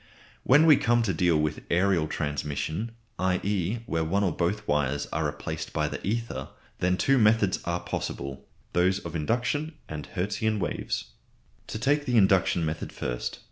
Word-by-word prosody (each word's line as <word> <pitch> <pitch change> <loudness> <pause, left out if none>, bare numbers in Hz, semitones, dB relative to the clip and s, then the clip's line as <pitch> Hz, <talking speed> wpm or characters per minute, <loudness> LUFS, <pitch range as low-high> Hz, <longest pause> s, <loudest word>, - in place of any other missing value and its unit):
When 145 +5 +6
we 155 -4 +8
come 120 0 +3
to 100 -4 0
deal 85 0 +3
with 75 -1 -2
aërial 85 -3 +2
transmission, 80 +8 -2 0.3
i.e. 95 +3 0
where 80 -8 0
one 95 +6 +1
or 95 - +2
both 90 +5 -1
wires 70 -1 +1
are - - +1
replaced - - -5
by - - +1
the - - -6
ether, 115 - -2 0.3
then 90 +1 +2
two 135 +8 +3
methods 105 -3 +4
are 85 0 -1
possible, 70 0 -4 0.3
those 90 +2 +3
of 85 -4 -7
induction 125 - -1
and 75 -1 -6
Hertzian 105 +4 -1
waves. 90 - -3 0.6
To - - -4
take 145 +5 +1
the 125 -2 +2
induction 95 -4 +4
method 80 0 -3
first. - - -3
95 Hz, 160 wpm, -27 LUFS, 80-110 Hz, 0.6 s, we